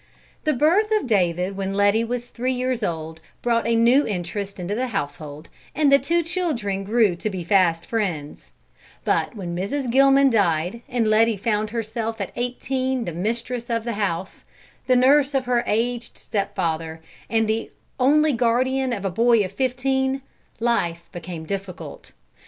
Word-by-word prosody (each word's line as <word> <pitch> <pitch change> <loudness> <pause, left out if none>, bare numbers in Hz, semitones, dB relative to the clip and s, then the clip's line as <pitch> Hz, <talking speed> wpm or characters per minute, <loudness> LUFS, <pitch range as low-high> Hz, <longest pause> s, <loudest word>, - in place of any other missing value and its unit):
The 305 - +3
birth 350 - +3
of - - -6
David 185 -4 +1
when 195 0 -3
Letty 205 +3 +3
was 245 +1 -4
three 255 +2 -2
years 255 -1 -1
old, 160 -4 -3 0.2
brought 235 -1 +1
a 230 - +2
new 240 +5 +5
interest 195 +1 -4
into 180 +3 -3
the 255 +4 -1
household, 150 - -5 0.3
and 290 -1 +3
the 275 - +7
two 335 +5 +1
children 300 - -2
grew 210 -2 +2
to 215 - -2
be 185 -3 -5
fast 170 -2 +2
friends; 180 -10 -3 0.6
but - - 0
when 175 -4 -5
Mrs. 235 +8 -2
Gilman 275 +1 +5
died, 180 0 +1
and 240 -3 0
Letty 220 0 +3
found 210 0 0
herself 225 0 -3
at 195 - -4
eighteen 255 +1 -2
the 170 - -4
mistress 230 +6 -3
of 230 -1 0
the 235 0 -3
house, 190 -4 -3 0.4
the 255 - +4
nurse 275 +3 +4
of 265 -1 +1
her 245 -1 +1
aged 235 +2 -1
stepfather, 165 -6 -2 0.3
and 225 -1 +2
the 220 +1 -1 0.3
only 300 +3 +4
guardian 255 +2 +1
of 200 -3 -4
a 195 - 0
boy 230 +1 +3
of 185 - -7
fifteen, 265 +2 0 0.4
life 175 -8 0
became 170 -2 -7
difficult. 195 0 -7
225 Hz, 160 wpm, -23 LUFS, 190-255 Hz, 0.6 s, the